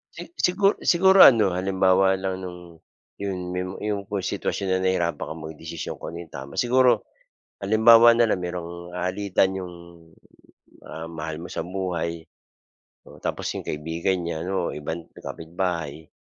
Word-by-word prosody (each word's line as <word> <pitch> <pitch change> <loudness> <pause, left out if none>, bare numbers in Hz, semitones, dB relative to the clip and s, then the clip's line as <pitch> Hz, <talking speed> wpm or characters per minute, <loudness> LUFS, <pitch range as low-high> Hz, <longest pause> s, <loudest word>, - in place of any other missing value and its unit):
Si - - -7 0.2
sigu 195 +3 +3
siguro 190 +2 +7
ano 105 -8 +6
halimbawa 95 0 +2
lang 95 0 -3
no'ng 90 -1 -7 0.6
'yon 100 -2 -4 0.2
may 90 - -1 0.2
'yong 100 -2 -2
kung 100 - 0
sitwasyon 95 +1 -2
na 95 - -1
nahirapan 85 -4 0
ka - - -5
magdesisyon 80 +1 -7
kung - - -8
ano 85 - -7
'yung 85 -4 -11
tama, 70 0 -8
siguro 125 -2 +3 0.5
halimbawa 115 +3 +7
na 120 - +4
lang - - 0
merong 85 0 -6
alitan 95 +1 0
'yong, 90 -2 -7 1.1
ah, 80 +1 -8
mahal 80 -1 -6
mo 85 - -7
sa - - -4
buhay 85 -2 -4 0.8
o - - -15
tapos - - -3
'yong - - -4
kaibigan 85 +4 -2
niya, 80 -2 -3
ano 90 0 -2
ibang 80 +3 -5
kapitbahay, 80 -2 -5
90 Hz, 150 wpm, -24 LUFS, 85-100 Hz, 1.1 s, siguro